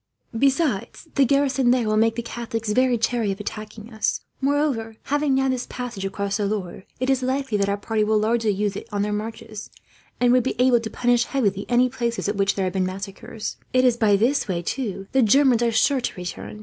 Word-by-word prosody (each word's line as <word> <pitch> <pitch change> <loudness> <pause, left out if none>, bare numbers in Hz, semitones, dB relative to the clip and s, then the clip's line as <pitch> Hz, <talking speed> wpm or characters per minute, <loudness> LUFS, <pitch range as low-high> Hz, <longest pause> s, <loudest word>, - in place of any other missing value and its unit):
Besides, 270 - 0
the 275 - +4
garrison 275 -1 +2
there 245 -1 +3
will 215 0 +1
make 225 +1 +3
the 235 - -3
Catholics 225 -2 -4
very 255 +1 +3
chary 225 -2 0
of 195 - -5
attacking 215 +2 -7
us. 220 - -1 0.2
Moreover, 270 -6 0
having 290 -1 +1
now 265 0 +2
this 255 -1 -1
passage 245 -6 -5
across 200 +1 -2
the 205 -2 0
Loire 195 -3 -4
it 255 - -1
is 265 -1 +2
likely 260 -2 -1
that 200 0 +1
our 200 - 0
party 215 +1 -1
will 215 +1 +2
largely 225 +1 +1
use 205 0 0
it - - -7
on 205 -1 0
their 210 0 -1
marches, 220 0 -6 0.5
and 245 0 +4
would 255 - +5
be 260 - -2
able 250 -1 +5
to 225 -1 -5
punish 245 +1 +2
heavily 205 -7 -1
any 245 +1 +4
places 235 -3 -2
at 205 - -1
which 195 0 +1
there 195 - 0
had 185 - -2
been 190 -1 +1
massacres. 195 +3 -6 0.2
It 255 0 +4
is 245 -2 +4
by 215 -3 +3
this 250 +8 +1
way, 175 -3 -2
too, 200 -4 -3
the 265 - +3
Germans 250 +1 +4
are 235 -1 +2
sure 255 +4 +2
to - - -3
return. 180 +3 -7
225 Hz, 220 wpm, -23 LUFS, 205-255 Hz, 0.5 s, would